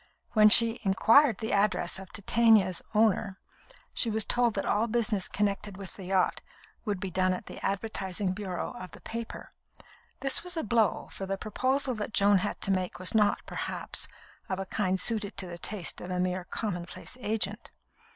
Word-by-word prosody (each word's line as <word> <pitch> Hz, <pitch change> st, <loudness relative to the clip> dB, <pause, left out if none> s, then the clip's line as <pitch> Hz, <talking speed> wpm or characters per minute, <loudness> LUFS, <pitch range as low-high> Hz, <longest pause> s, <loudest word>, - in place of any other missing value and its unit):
When 215 Hz, -2 st, +7 dB
she 230 Hz, +1 st, +5 dB
inquired 225 Hz, +5 st, +4 dB
the 220 Hz, -, -4 dB
address 190 Hz, -3 st, +1 dB
of 190 Hz, -1 st, -11 dB
Titania's 210 Hz, -3 st, +3 dB
owner, 210 Hz, -2 st, +2 dB, 0.6 s
she 235 Hz, -, +1 dB
was 220 Hz, -1 st, +5 dB
told 240 Hz, -2 st, +2 dB
that 195 Hz, -, -2 dB
all 215 Hz, +3 st, +1 dB
business 220 Hz, -4 st, 0 dB
connected 205 Hz, -1 st, -2 dB
with 195 Hz, -3 st, -8 dB
the 190 Hz, -, -9 dB
yacht 185 Hz, 0 st, +1 dB, 0.4 s
would 205 Hz, -4 st, -2 dB
be 190 Hz, 0 st, -4 dB
done 185 Hz, +1 st, +2 dB
at 180 Hz, -, -6 dB
the -, -, -10 dB
advertising 195 Hz, -2 st, -2 dB
bureau 185 Hz, -3 st, -4 dB
of 185 Hz, -, -8 dB
the -, -, -12 dB
paper. 230 Hz, 0 st, -7 dB, 0.7 s
This 270 Hz, +3 st, +2 dB
was 360 Hz, -1 st, -3 dB
a 320 Hz, -, -1 dB
blow, 225 Hz, -7 st, +1 dB
for 195 Hz, -, -6 dB
the 195 Hz, 0 st, -2 dB
proposal 260 Hz, +6 st, 0 dB
that 215 Hz, -1 st, -5 dB
Joan 200 Hz, -1 st, +5 dB
had 205 Hz, +2 st, -3 dB
to 195 Hz, -, +2 dB
make 185 Hz, -2 st, -1 dB
was 185 Hz, +1 st, +2 dB
not, 210 Hz, -2 st, +2 dB
perhaps, -, -, -3 dB, 0.4 s
of 190 Hz, -, -1 dB
a 195 Hz, -, -4 dB
kind 190 Hz, -1 st, 0 dB
suited 215 Hz, -2 st, +1 dB
to 190 Hz, -, 0 dB
the 175 Hz, -1 st, -8 dB
taste 195 Hz, -4 st, -2 dB
of 180 Hz, -, -7 dB
a 180 Hz, 0 st, -2 dB
mere 180 Hz, 0 st, -1 dB
commonplace 180 Hz, 0 st, -4 dB
agent. 210 Hz, -1 st, -2 dB
205 Hz, 180 wpm, -29 LUFS, 185-225 Hz, 0.7 s, When